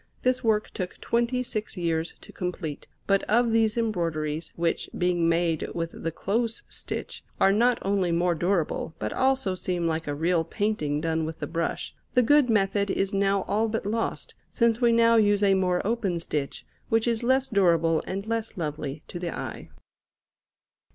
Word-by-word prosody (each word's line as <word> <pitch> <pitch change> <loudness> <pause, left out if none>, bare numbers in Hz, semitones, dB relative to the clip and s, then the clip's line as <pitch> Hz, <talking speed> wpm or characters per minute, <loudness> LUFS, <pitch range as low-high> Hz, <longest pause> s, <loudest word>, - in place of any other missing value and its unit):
This 255 0 +1
work 215 -2 +1
took 180 -2 -5
twenty 240 +2 0
six 215 -5 -4
years 165 -1 -1
to - - -13
complete; 175 -5 -5 0.2
but 195 0 +3
of 235 +2 +3
these 225 0 +2
embroideries, 165 -8 -1
which, 170 0 -1
being 175 -2 +2
made 165 -1 +1
with 165 -1 -2
the 165 - -4
close 225 +7 -1
stitch, - - -6 0.2
are 195 - +5
not 235 +4 +3
only 195 -3 +1
more 175 +1 +2
durable 170 -2 -1
but 105 - -3
also 265 -6 +1
seem 180 -1 -2
like 165 -1 -1
a 145 - -2
real 165 +2 +1
painting 165 -6 -1
done 160 0 0
with 160 +1 -4
the - - -4
brush, 165 0 -3 0.2
the 250 - +5
good 290 +1 +4
method 200 -1 +2
is 195 +1 0
now 195 -1 +2
all 215 +2 0
but 220 -2 -3
lost, 225 +2 -2 0.2
since 235 -1 +1
we 240 -1 +5
now 230 0 +5
use 205 -1 +3
a 195 -1 +5
more 185 -1 +1
open 205 -5 0
stitch, 150 -4 -4 0.2
which 225 +1 +2
is 230 -2 +1
less 260 +2 +2
durable 170 -6 +3
and 195 +2 -3
less 225 -1 -3
lovely 150 -2 -4
to 175 - -6
the 175 -1 -3
eye. - - -6
195 Hz, 175 wpm, -26 LUFS, 165-225 Hz, 0.2 s, are